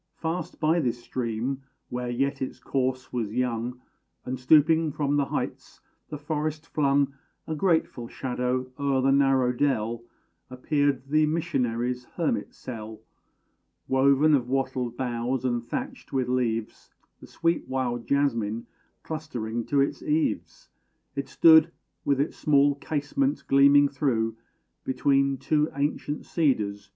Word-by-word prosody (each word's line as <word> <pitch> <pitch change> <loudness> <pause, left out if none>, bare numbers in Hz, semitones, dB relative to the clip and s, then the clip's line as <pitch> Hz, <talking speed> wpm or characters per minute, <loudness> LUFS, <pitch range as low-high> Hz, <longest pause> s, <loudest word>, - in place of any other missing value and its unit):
Fast 165 +2 -4
by 160 +2 +3
this 125 -6 0
stream, 125 +2 -3 0.3
where 125 0 -3
yet 135 +3 -1
its 130 - -4
course 130 -1 -2
was 115 -3 -2
young, 125 0 -1 0.5
And, 130 0 -4
stooping 155 +4 +4
from 145 0 0
the 145 -1 +2
heights, - - -5 0.3
the 150 - -5
forest 155 +1 -3
flung 140 -3 +1 0.3
A 160 - -3
grateful 160 -7 0
shadow 125 0 -2
o'er 140 -2 +1
the 135 - +4
narrow 135 -2 +3
dell, 120 -3 0 0.5
Appeared 140 +2 0
the 155 +2 +3
missionary's 125 -6 -1
hermit - - -1
cell. 110 -3 -8 0.9
Woven 140 +3 +4
of 125 -4 +2
wattled 130 -3 -1
boughs, 125 0 -2
and 120 -2 0
thatched 120 - -6
with 130 -2 0
leaves, 115 -3 -2 0.3
The - - -13
sweet 165 0 -1
wild 125 -3 -2
jasmine 115 -6 0 0.4
clustering 120 -8 -4
to 140 -2 +2
its 140 - -1
eaves, 155 +1 -1 0.5
It 140 -1 -4
stood, 160 0 +6 0.3
with 140 -1 +1
its 145 - 0
small 145 -1 +3
casement 155 - -1
gleaming 140 +1 +6
through 125 -6 0 0.5
Between 140 0 +2
two 150 +2 +1
ancient 145 +1 -2
cedars. 105 - 0
135 Hz, 130 wpm, -26 LUFS, 125-145 Hz, 0.9 s, stood